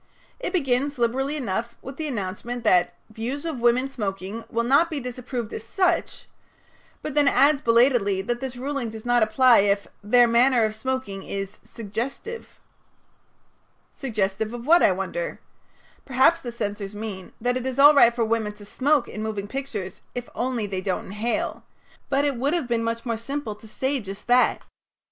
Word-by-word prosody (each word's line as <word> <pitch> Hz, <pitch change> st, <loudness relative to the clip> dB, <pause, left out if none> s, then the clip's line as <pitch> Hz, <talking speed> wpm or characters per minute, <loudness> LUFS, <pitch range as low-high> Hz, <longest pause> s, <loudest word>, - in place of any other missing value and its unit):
It -, -, -3 dB
begins, 280 Hz, -4 st, 0 dB
liberally 260 Hz, +5 st, 0 dB
enough, 235 Hz, -2 st, -3 dB
with 270 Hz, +1 st, -8 dB
the 315 Hz, -, -3 dB
announcement 230 Hz, +1 st, -4 dB
that 180 Hz, -5 st, +3 dB, 0.2 s
"Views 245 Hz, +8 st, -4 dB
of 315 Hz, -6 st, -3 dB
women 240 Hz, +2 st, +3 dB
smoking 205 Hz, -3 st, -4 dB
will 230 Hz, +1 st, 0 dB
not 280 Hz, +8 st, +4 dB
be 310 Hz, -4 st, -3 dB
disapproved 250 Hz, -2 st, -5 dB
as -, -, -5 dB
such," 355 Hz, -, 0 dB, 0.8 s
but 305 Hz, -, -4 dB
then 295 Hz, -1 st, +3 dB
adds 280 Hz, +2 st, +4 dB
belatedly 230 Hz, -5 st, +3 dB
that 240 Hz, +4 st, -2 dB
this 260 Hz, -2 st, -5 dB
ruling 270 Hz, -2 st, -3 dB
does 220 Hz, 0 st, -9 dB
not 245 Hz, 0 st, +3 dB
apply 240 Hz, +3 st, +5 dB
if 200 Hz, 0 st, +2 dB, 0.2 s
"their 240 Hz, +3 st, +5 dB
manner 235 Hz, 0 st, +4 dB
of 215 Hz, -, -2 dB
smoking 240 Hz, -4 st, -3 dB
is 195 Hz, +1 st, -5 dB
suggestive." 235 Hz, -, -6 dB, 1.3 s
Suggestive 215 Hz, -3 st, -2 dB
of 240 Hz, 0 st, -8 dB
what, 340 Hz, +4 st, +6 dB
I -, -, +5 dB
wonder? -, -, -3 dB, 0.6 s
Perhaps 270 Hz, +6 st, +3 dB
the 240 Hz, -, -5 dB
censors 205 Hz, -3 st, -4 dB
mean 205 Hz, -3 st, -6 dB
that 245 Hz, +2 st, 0 dB
it 255 Hz, 0 st, -2 dB
is 260 Hz, 0 st, -3 dB
all 290 Hz, +2 st, +9 dB
right 255 Hz, -5 st, +7 dB
for 235 Hz, -2 st, +1 dB
women 220 Hz, -2 st, -1 dB
to 205 Hz, 0 st, -13 dB
smoke 275 Hz, +5 st, +1 dB
in 215 Hz, -, -6 dB
moving 215 Hz, -2 st, -3 dB
pictures 265 Hz, -7 st, -5 dB
if 245 Hz, 0 st, -4 dB
only 245 Hz, -3 st, -1 dB
they 195 Hz, -2 st, -3 dB
don't 185 Hz, -1 st, -2 dB
inhale, 215 Hz, +4 st, -2 dB, 0.5 s
but 280 Hz, +1 st, +2 dB
it 280 Hz, -4 st, 0 dB
would 280 Hz, +7 st, +1 dB
have 325 Hz, -8 st, -1 dB
been 235 Hz, -1 st, 0 dB
much 230 Hz, +1 st, -3 dB
more 230 Hz, -2 st, -1 dB
simple 275 Hz, 0 st, -4 dB
to 210 Hz, +2 st, -15 dB
have -, -, -16 dB
said 265 Hz, -2 st, -1 dB
just 195 Hz, +2 st, -8 dB
that. 245 Hz, +1 st, +3 dB
No. -, -, -22 dB
240 Hz, 180 wpm, -24 LUFS, 215-270 Hz, 1.3 s, all